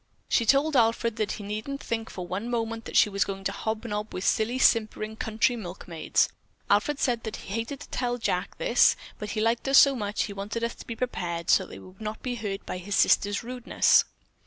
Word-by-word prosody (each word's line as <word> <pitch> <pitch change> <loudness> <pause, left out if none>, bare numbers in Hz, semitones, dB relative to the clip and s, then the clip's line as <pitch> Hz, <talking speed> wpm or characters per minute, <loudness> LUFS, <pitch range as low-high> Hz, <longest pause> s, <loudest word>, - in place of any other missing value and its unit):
She 230 - +2
told 285 +4 +3
Alfred 230 -1 +2
that 215 -2 -1
he 210 - -7
needn't 215 +7 -4
think 225 -1 -3
for 180 - -6
one 190 +6 -4
moment 230 -1 -2
that - - -1
she - - +7
was 200 -1 +1
going 195 0 -6
to 195 - 0
hobnob 215 0 -4
with 185 - -4
silly, 225 +5 +1
simpering 220 -3 +2
country 220 +3 +1
milkmaids! 175 -6 -1 0.4
Alfred 220 +8 +3
said 240 -3 +1
that 220 - -4
he 195 - -8
hated 230 +5 -4
to - - -10
tell 245 -1 -1
Jack 235 - -1
all - - -3
this, - - +5 0.2
but 210 - -5
he 215 0 -2
liked 230 +3 +1
us 270 0 +5
so 275 -1 +7
much 205 -3 -1
he 205 - -5
wanted 205 +4 -4
us 235 - -1
to - - -13
be 230 - -4
prepared, 175 -9 -2
so 190 - +4
that - - -12
we - - -13
would 185 +3 -16
not 215 0 -5
be 250 - -2
hurt 210 -4 -4
by 180 - -4
his 200 +3 -3
sister's 200 -1 +3
rudeness." 250 +1 +3
220 Hz, 225 wpm, -27 LUFS, 200-240 Hz, 0.4 s, she